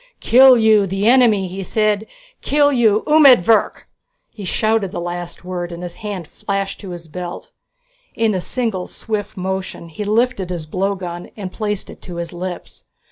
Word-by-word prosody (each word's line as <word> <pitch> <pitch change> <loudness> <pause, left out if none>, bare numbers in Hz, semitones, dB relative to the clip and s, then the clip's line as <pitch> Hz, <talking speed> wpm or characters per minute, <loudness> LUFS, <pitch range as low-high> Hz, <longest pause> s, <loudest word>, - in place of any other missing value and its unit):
"Kill 255 +1 +7
you, 220 -3 +4
the 195 +3 -1
enemy!" 230 -6 +4
he 190 +2 -6
said. 215 +2 0 0.3
"Kill 290 0 +3
you 220 -4 +3
umedvirk!" 265 - +5 0.4
He 210 - -10
shouted 215 +2 0
the - - -4
last 175 0 -6
word 180 -1 -4
and 170 +1 -7
his 175 -1 -5
hand 200 -6 -5
flashed 195 +2 -4
to 195 - -9
his 175 -2 -8
belt. 175 +2 -7 0.6
In 225 -1 +1
a 185 - -1
single 220 -5 -2
swift 210 -2 -5
motion 190 -2 -4
he 165 +6 -6
lifted 215 -2 0
his 175 -3 -4
blowgun 185 0 -3
and 190 -3 -6
placed 210 -1 -3
it - - -14
to 180 - -9
his 170 0 -5
lips. 175 0 -7
195 Hz, 165 wpm, -19 LUFS, 180-220 Hz, 0.6 s, Kill